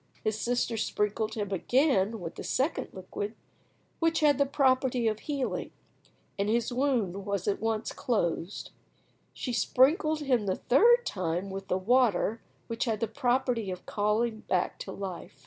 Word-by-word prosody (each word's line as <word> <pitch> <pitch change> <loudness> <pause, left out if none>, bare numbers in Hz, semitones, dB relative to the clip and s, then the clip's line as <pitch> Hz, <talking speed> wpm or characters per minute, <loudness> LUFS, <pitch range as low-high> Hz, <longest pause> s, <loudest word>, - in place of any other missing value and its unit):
His 215 0 -1
sister 240 -1 0
sprinkled 215 +1 -1
him 205 -3 -3
again 225 - +2
with 165 -3 -6
the - - -8
second 275 +6 0
liquid, 205 +3 -6 0.6
which 330 -1 +2
had 290 -3 +4
the 280 - +3
property 260 -3 +2
of 215 -1 0
healing, 280 -2 -3 0.7
and 200 +1 +1
his 235 +2 +1
wound 245 -8 +1 0.3
at 200 - +1
once 225 0 -1
closed. 180 -5 -2 0.6
She 250 - -4
sprinkled 305 - +3
him 250 -7 +1
the 185 - +1
third 475 - +4
time 185 +1 -2
with 195 0 -6
the 185 - +1
water 225 0 +2 0.2
which 230 +1 -2
had 220 -3 -1
the 230 - 0
property 245 -1 0
of 180 -1 -6
calling 215 +2 0
back 180 - 0
to - - -6
life. 185 -6 -7
225 Hz, 150 wpm, -29 LUFS, 200-260 Hz, 0.7 s, had